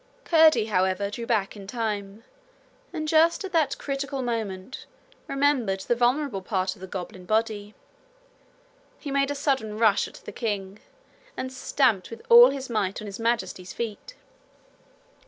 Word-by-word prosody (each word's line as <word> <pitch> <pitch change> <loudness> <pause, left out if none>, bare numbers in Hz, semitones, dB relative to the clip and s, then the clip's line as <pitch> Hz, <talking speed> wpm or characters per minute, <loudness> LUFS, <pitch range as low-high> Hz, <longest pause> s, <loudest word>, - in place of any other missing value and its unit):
Curdie, 315 -9 +5
however, 190 -1 0
drew 230 +2 -6
back 215 -5 0
in 200 -2 -10
time, 210 -2 -4 0.7
and 310 -3 -4
just 325 +3 +4
at 385 - -6
that 320 -5 +1
critical 275 -1 -3
moment 220 -3 -4 0.4
remembered 270 -9 +1
the 240 - 0
vulnerable 245 -2 +1
part 185 -1 -1
of 185 - -19
the 190 - -7
goblin 185 0 -7
body. 215 0 -1 1.2
He 285 - -7
made 275 0 +1
a 285 - -2
sudden 265 -7 -1
rush 215 -3 +3
at - - -14
the - - -10
king 205 -3 -4 0.6
and 260 0 -4
stamped 250 -7 +1
with 230 0 -10
all 240 +2 +10
his 270 -1 -5
might 205 -5 -1
on 215 - -7
His 200 0 -7
Majesty's 190 -6 -2
feet. 235 - -6
230 Hz, 150 wpm, -26 LUFS, 200-275 Hz, 1.2 s, all